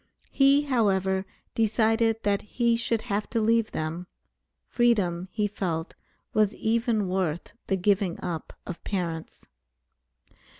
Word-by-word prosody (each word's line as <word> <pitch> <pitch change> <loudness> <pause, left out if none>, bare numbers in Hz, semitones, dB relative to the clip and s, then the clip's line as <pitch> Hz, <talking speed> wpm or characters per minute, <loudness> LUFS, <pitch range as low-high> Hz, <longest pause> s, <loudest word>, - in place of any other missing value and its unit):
He, 275 +1 +5
however, 195 -7 +1 0.3
decided 225 0 +2
that 200 -1 +1
he 235 +2 +1
should 230 -1 0
have 205 +1 -2
to 230 - 0
leave 225 0 +2
them. 165 +3 -4 0.6
Freedom, 195 -8 +1
he 210 -2 0
felt, 175 -5 -3 0.4
was 215 -1 +2
even 225 -2 +1
worth 180 -3 -2
the 195 - +1
giving 190 -1 +1
up 165 -3 -4
of 180 - -7
parents. 170 -5 -4
205 Hz, 120 wpm, -27 LUFS, 180-225 Hz, 0.6 s, He